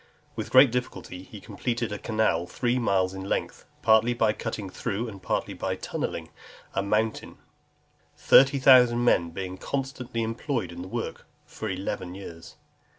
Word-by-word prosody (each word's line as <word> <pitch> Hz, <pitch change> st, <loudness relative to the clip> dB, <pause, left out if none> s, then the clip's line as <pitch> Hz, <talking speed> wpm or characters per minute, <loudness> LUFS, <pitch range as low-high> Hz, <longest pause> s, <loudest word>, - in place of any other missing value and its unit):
With -, -, -4 dB
great 130 Hz, -1 st, +7 dB
difficulty 125 Hz, -7 st, -4 dB
he 105 Hz, +2 st, -11 dB
completed 120 Hz, +1 st, -3 dB
a 105 Hz, -, -4 dB
canal 110 Hz, -6 st, 0 dB
three 120 Hz, +4 st, 0 dB
miles 95 Hz, -5 st, +1 dB
in 95 Hz, -, -6 dB
length, -, -, -3 dB, 0.2 s
partly 110 Hz, +2 st, +4 dB
by 110 Hz, -2 st, +2 dB
cutting 110 Hz, -3 st, -5 dB
through, 100 Hz, +4 st, -3 dB
and 100 Hz, -4 st, -9 dB
partly -, -, -2 dB
by -, -, -3 dB
tunnelling, -, -, -4 dB, 0.4 s
a 95 Hz, -, 0 dB
mountain; 105 Hz, +2 st, -1 dB, 0.8 s
thirty 135 Hz, +1 st, +6 dB
thousand 125 Hz, -3 st, +6 dB
men 85 Hz, -8 st, +3 dB
being 95 Hz, +1 st, -6 dB
constantly 130 Hz, -3 st, -3 dB
employed 115 Hz, -, -3 dB
in 85 Hz, 0 st, -8 dB
the 90 Hz, -, -7 dB
work -, -, -5 dB, 0.2 s
for 110 Hz, -, -6 dB
eleven 95 Hz, -1 st, -4 dB
years. 85 Hz, -4 st, -10 dB
110 Hz, 150 wpm, -26 LUFS, 95-120 Hz, 0.8 s, great